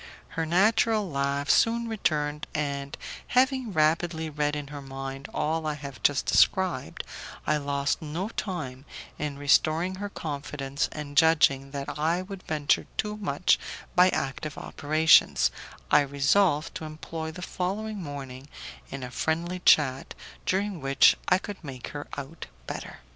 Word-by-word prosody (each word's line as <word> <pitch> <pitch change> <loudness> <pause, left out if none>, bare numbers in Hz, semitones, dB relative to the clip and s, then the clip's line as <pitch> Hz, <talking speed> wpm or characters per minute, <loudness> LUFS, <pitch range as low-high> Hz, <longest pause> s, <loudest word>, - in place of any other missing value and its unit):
Her 165 0 -2
natural 215 +4 +3
laugh 140 -1 -1
soon 230 +1 +3
returned, 150 -9 -1
and, 140 -1 -2 0.4
having 260 -3 +3
rapidly 160 0 +1
read 150 0 0
in 145 -2 -5
her 145 -1 -7
mind 135 0 -7
all 160 +1 -1
I 150 - -1
have 140 -3 -9
just 145 -2 +2
described, 190 -3 +2 0.4
I 150 - +2
lost 140 -1 -1
no 165 +6 -3
time 150 - -5 0.3
in 145 -2 -3
restoring 155 +5 +3
her 205 +1 -4
confidence, 140 -4 -3
and, 145 -2 -7
judging 150 -4 +4
that 140 +1 -5
I 165 +4 +1
would 195 0 -8
venture 150 -4 0
too 210 0 -1
much 180 -5 +2 0.4
by 180 +1 +7
active 140 -1 -3
operations, 155 +2 +4 0.4
I - - +7
resolved 145 +4 +2
to 160 - -7
employ 160 +1 -6
the 180 +3 -8
following 200 +4 -3
morning 140 -3 -7 0.4
in 135 -1 -6
a 125 - -6
friendly 170 +6 -1
chat 135 -6 +3 0.3
during 195 -2 0
which 135 0 +5
I 185 - +6
could 200 -1 -8
make 130 -4 -7
her 145 0 -7
out 140 +4 -7 0.2
better. - - -7
155 Hz, 140 wpm, -27 LUFS, 140-180 Hz, 0.4 s, by